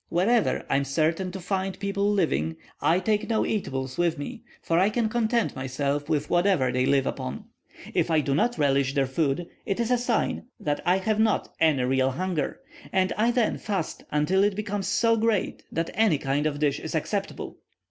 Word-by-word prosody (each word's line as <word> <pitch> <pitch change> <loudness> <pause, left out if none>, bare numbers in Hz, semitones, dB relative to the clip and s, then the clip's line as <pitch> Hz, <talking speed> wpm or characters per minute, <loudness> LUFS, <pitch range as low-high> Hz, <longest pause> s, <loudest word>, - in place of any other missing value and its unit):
Wherever 210 +7 +2
I 135 - +2
am 140 - +1
certain 160 +6 0
to 190 - -6
find 190 +1 -2
people 200 0 0
living, 80 - 0 0.3
I 170 +3 +3
take 210 +3 0
no 220 -1 +2
eatables 135 -10 -3
with 170 -2 +2
me, 225 - -6 0.2
for 165 0 +1
I 190 +3 +4
can 220 0 0
content 235 0 0
myself 140 +3 -2
with 150 -2 0
whatever 175 -8 +2
they 125 +1 +1
live 135 -1 +3
upon; 65 +2 -4 0.5
if - - +1
I 160 -1 +3
do 140 -2 0
not 240 - +1
relish 140 -1 +2
their 140 -1 +3
food, 140 +4 0 0.2
it 195 - -2
is 235 +1 0
a 250 - +3
sign 240 0 -1
that 150 -8 -1
I 180 +2 +5
have 215 +2 0
not 220 -1 +1
any 150 -5 +3
real 130 +1 +2
hunger, 170 +1 -2 0.3
and 185 0 +2
I 225 +3 +2
then 240 -2 +1
fast 195 -7 -3
until 160 +7 +2
it 205 -1 +2
becomes 205 -1 -3
so 230 0 +3
great 220 -3 0
that 165 0 -2
any 215 -8 +3
kind 140 +2 0
of 145 -1 -2
dish 145 -2 +1
is - - -5
acceptable. - - -3
175 Hz, 195 wpm, -26 LUFS, 140-210 Hz, 0.5 s, I